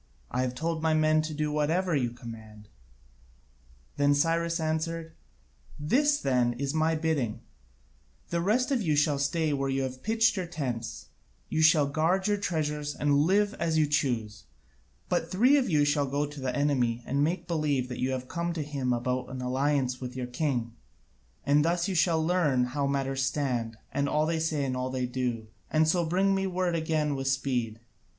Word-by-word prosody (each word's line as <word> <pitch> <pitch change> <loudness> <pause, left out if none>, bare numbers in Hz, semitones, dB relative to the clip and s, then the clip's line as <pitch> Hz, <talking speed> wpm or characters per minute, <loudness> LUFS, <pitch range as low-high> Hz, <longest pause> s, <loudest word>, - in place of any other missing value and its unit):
I 125 - 0
have 125 -1 -2
told 160 +3 -2
my 160 -1 +2
men 155 0 +3
to 155 0 -5
do 150 0 -1
whatever 160 +4 +1
you 125 -4 +1
command." 110 -3 -11 1.3
Then 145 0 +3
Cyrus 165 +3 +1
answered: 160 +1 -2 0.7
"This, 285 - +2
then, 125 -2 +1
is 135 +3 -3
my 160 +1 +2
bidding: 155 -8 -1 0.9
the 170 0 0
rest 235 +9 +1
of 260 -4 +2
you 155 -6 +1
shall 145 -1 +2
stay 150 +2 0
where 135 -1 -1
you 135 0 0
have 130 0 -5
pitched 225 0 +2
your 185 -2 -2
tents; 125 -9 -5 0.4
you 160 - 0
shall 155 -2 +5
guard 160 +7 +1
your 205 0 +2
treasures 150 -6 -2
and 145 -1 +1
live 205 +2 +2
as 165 -2 0
you 155 - +4
choose: 120 -8 -1 0.6
but - - -1
three 245 +9 +4
of 275 -3 +2
you 150 -3 +3
shall 145 -1 +1
go 140 +2 0
to 145 -1 -9
the 130 -1 -2
enemy 125 -5 +1
and 140 +2 +1
make 175 +4 -1
believe 150 -6 0
that 125 - -6
you 130 - +1
have 130 -1 -3
come 170 +1 -2
to 160 -3 -3
him 140 -3 -2
about 125 +1 -2
an 130 0 -6
alliance 130 0 0
with 125 0 -6
your 130 -1 -3
king, 125 -3 -2 0.7
and 145 +1 +4
thus 170 +2 +1
you 195 - -1
shall 165 -2 +2
learn 155 -8 +2
how 140 +3 -1
matters 135 -1 -1
stand, 125 -5 -1 0.2
and 140 0 0
all 150 0 +2
they 165 0 0
say 155 -3 0
and 130 -1 -2
all 125 0 -2
they 130 -1 -2
do, 125 -3 -2 0.2
and 155 0 +3
so 175 +2 +2
bring 190 +4 +2
me 195 0 0
word 180 -1 -1
again 155 -2 0
with 135 0 -3
speed. 125 -5 -1
145 Hz, 185 wpm, -28 LUFS, 130-165 Hz, 1.3 s, shall